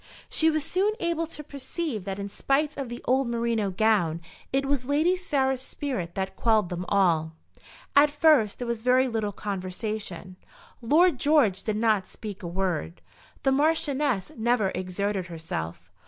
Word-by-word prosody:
She 320 - +3
was 310 -2 0
soon 395 +4 +1
able 335 -1 -1
to 300 -2 -8
perceive 280 - -5
that 195 -1 -4
in 200 0 -4
spite 285 +8 0
of 270 -4 -4
the 240 - -7
old 260 +1 +2
merino 230 -3 0
gown, 185 -5 +2 0.3
it 275 +1 +1
was 270 -2 -1
Lady 310 +6 +3
Sarah's 265 -7 0
spirit 255 -11 -4
that 190 0 -3
quelled 220 -5 +2
them 180 0 -4
all. 165 -5 +2 0.6
At 290 +1 +7
first 290 -8 +4
there 245 - -5
was 235 -2 -2
very 255 +2 +4
little 220 -4 -1
conversation. 190 -1 -5 0.4
Lord 305 +4 +4
George 265 -11 +3
did 215 0 -2
not 215 -4 +2
speak 210 -2 -8
a 175 - -5
word. 175 -2 -2 0.4
The 270 - +3
Marchioness 285 - +1
never 225 -4 +1
exerted 185 0 -2
herself. 160 - -6
230 Hz, 155 wpm, -26 LUFS, 190-285 Hz, 0.6 s, At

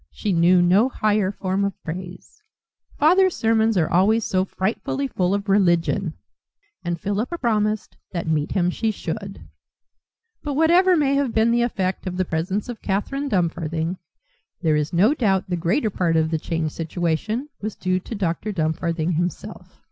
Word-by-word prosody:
She 205 - -2
knew 175 +1 +5
no 195 +8 +4
higher 210 -5 +1
form 190 0 -2
of 200 -1 -2
praise: 180 - -8 0.6
"Father's 365 +4 +4
sermons 225 -1 +2
are 160 -3 +2
always 205 +6 +3
so 185 0 +1
frightfully 215 +8 -2
full 185 -5 0
of 200 +1 -4
religion." 180 -2 +2 0.7
And 175 -1 -2
Philippa 210 - -2
promised 215 -5 0 0.2
that 170 -2 -3
meet 155 -2 0
him 180 -2 +1
she 225 +4 -1
should. 195 0 -6 0.9
But 290 -2 -3
whatever 345 +4 +4
may 280 -3 +2
have 275 -4 0
been 225 +1 +3
the 240 0 +2
effect 190 -5 -1
of 180 0 -4
the 185 - +1
presence 180 +7 -2
of 245 -2 -7
Catherine 275 +9 -2
Dumfarthing, 170 - -1 0.6
there 155 -2 +3
is 150 0 -1
no 200 +10 +4
doubt 195 -9 +1
the 180 - -1
greater 200 - 0
part 170 -3 0
of 160 0 +2
the 160 - 0
changed 160 -1 -2
situation 175 - -2
was 215 0 -4
due 185 0 0
to 225 - -7
Dr. 195 +2 -2
Dumfarthing 165 -1 -1
himself. 175 -1 -5
190 Hz, 165 wpm, -22 LUFS, 170-220 Hz, 0.9 s, knew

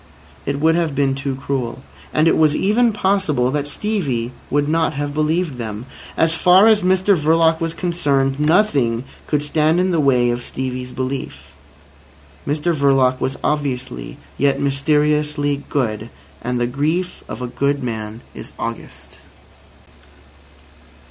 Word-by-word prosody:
It 140 0 -1
would 160 +2 +4
have 165 -4 0
been 135 -1 +2
too 135 0 -3
cruel. 135 -2 -4 0.3
And 155 +1 +3
it - - +4
was 155 -1 +3
even 225 +4 +3
possible 190 -11 +1
that 145 0 -2
Stevie 145 - -2 0.2
would 145 0 +1
not 160 -1 +1
have 145 0 -3
believed 155 -1 0
them. 110 -1 -5 0.3
As 160 0 +3
far 180 +4 +5
as 220 -2 +5
Mr 190 +2 +3
Verloc 160 +1 +3
was 165 0 -2
concerned, 145 -6 0
nothing 150 - +2 0.2
could 150 -1 0
stand 155 +3 +2
in 185 +1 +1
the 170 - +1
way 125 -4 +3
of 120 0 -3
Stevie's 125 0 -5
belief. 130 +1 -5 1.0
Mr 150 +4 0
Verloc 135 -3 +2
was 130 - -1
obviously 125 - -2 0.2
yet 140 0 +2
mysteriously 145 +1 +1
good. 115 -5 -2 0.3
And 125 +1 -2
the 120 - +1
grief 155 +8 -2
of - - -6
a 125 - -3
good 140 +2 -1
man 110 -1 -5
is - - -9
august. - - -7
145 Hz, 140 wpm, -19 LUFS, 130-165 Hz, 1.0 s, far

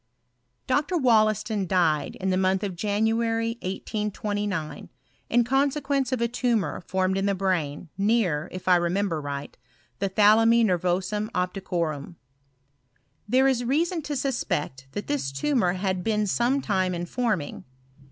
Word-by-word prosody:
Dr. 290 +7 +1
Wollaston 215 - +2
died 165 -4 +1
in 190 0 -2
the - - +2
month 190 +1 +1
of 195 -3 -3
January, 225 +3 0
1829, 205 -4 -3 0.4
in 240 +1 +4
consequence 275 +1 0
of 255 - 0
a 235 - +3
tumour 235 - -1
formed 190 +1 0
in 195 - 0
the 200 - +1
brain, 180 -5 -1
near, 195 -7 +1
if 185 0 -8
I 180 -1 +6
remember 175 -1 0
right, 145 0 -6 0.4
the 195 - 0
thalami 225 +4 +5
nervorum 185 +3 0
op 180 0 0
ticorum. 170 -5 -3 1.1
There 260 +3 +4
is 255 -2 +1
reason 325 +7 0
to 295 0 -4
suspect 150 - -2
that 205 - -4
this 135 -2 -2
tu 215 - -1
mour 180 -8 +3
had 185 -1 -2
been 215 0 +1
some 240 +7 +1
time 185 -6 0
in 175 0 -3
forming. 210 - -2
200 Hz, 140 wpm, -25 LUFS, 180-235 Hz, 1.1 s, I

